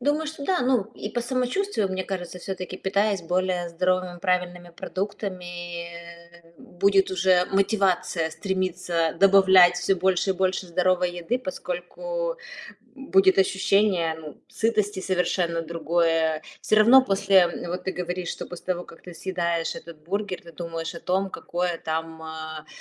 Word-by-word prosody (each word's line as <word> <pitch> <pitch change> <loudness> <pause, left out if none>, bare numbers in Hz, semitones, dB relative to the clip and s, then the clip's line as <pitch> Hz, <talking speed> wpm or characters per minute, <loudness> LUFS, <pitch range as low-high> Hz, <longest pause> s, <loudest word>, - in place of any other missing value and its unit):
Думаю, 295 +4 0
что 300 -2 -6
да. 365 +3 +1
Ну, 250 -3 +3
и - - -5
по 240 - -2
самочувствию, 255 - -1
мне 190 0 -2
кажется, 180 -2 -5
всё-таки, 185 -1 -5
питаясь 200 0 0
более 180 0 0
здоровыми, 180 +1 -1
правильными 180 -1 -1
продуктами, 180 -2 -5
э, 170 0 -13
будет 195 +1 +2
уже 185 -1 +3
мотивация 195 -5 +1
стремиться 180 -3 -1
добавлять 190 -2 +7
всё 180 +2 +1
больше 190 +1 +1
и - - +4
больше 185 0 -1
здоровой 180 +1 +1
еды. 175 +8 -2
Поскольку, - - -4 0.6
м, 270 0 -10
будет 190 0 +5
ощущение, 190 -3 +2
ну, 150 -3 -11
сытости 210 -3 0
совершенно 180 -2 0
другое. 165 -1 0 0.2
Всё - - +2
равно 235 +5 +8
после 195 -3 +4 0.2
вот 180 +1 -4
ты 190 - -2
говоришь, 180 0 -4
что - - -5
после 175 - -10
того, 180 -1 -1
как 165 - -15
ты 180 - -10
съедаешь 170 -2 -2
этот 165 -2 -10
бургер, 195 +2 -3
ты 170 - -12
думаешь 165 0 -5
о - - -8
том, 190 +1 0
какое 175 -1 -3
там 160 0 -4
а, 155 -1 -7
185 Hz, 145 wpm, -25 LUFS, 170-195 Hz, 0.6 s, равно